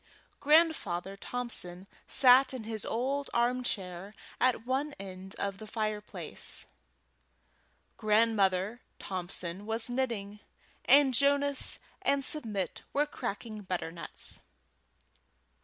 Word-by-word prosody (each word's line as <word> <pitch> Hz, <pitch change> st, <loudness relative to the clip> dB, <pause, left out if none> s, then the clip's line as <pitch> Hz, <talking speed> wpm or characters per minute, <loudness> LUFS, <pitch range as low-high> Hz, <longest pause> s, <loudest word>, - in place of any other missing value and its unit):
Grandfather 285 Hz, -, +2 dB
Thompson 195 Hz, -5 st, -3 dB, 0.2 s
sat 260 Hz, +1 st, +6 dB
in 245 Hz, -, -6 dB
his 220 Hz, -1 st, -4 dB
old 270 Hz, +5 st, -1 dB
armchair 215 Hz, -6 st, -1 dB, 0.2 s
at 250 Hz, -2 st, +2 dB
one 275 Hz, +4 st, -1 dB
corner 190 Hz, -1 st, -8 dB
of 200 Hz, 0 st, -3 dB
the 215 Hz, -, -9 dB
fireplace, 215 Hz, -1 st, -4 dB, 1.3 s
Grandmother 210 Hz, -1 st, +2 dB, 0.2 s
Thompson 185 Hz, 0 st, -3 dB
was 225 Hz, +2 st, +2 dB
knitting, 225 Hz, -5 st, -2 dB, 0.5 s
and 275 Hz, -1 st, +6 dB
Jonas 280 Hz, +2 st, +4 dB, 0.2 s
and 280 Hz, -1 st, +1 dB
Submit 215 Hz, -, -2 dB
were 290 Hz, +1 st, +3 dB
cracking 215 Hz, -6 st, -5 dB
butternuts. 175 Hz, -3 st, -3 dB
225 Hz, 90 wpm, -31 LUFS, 195-260 Hz, 1.3 s, sat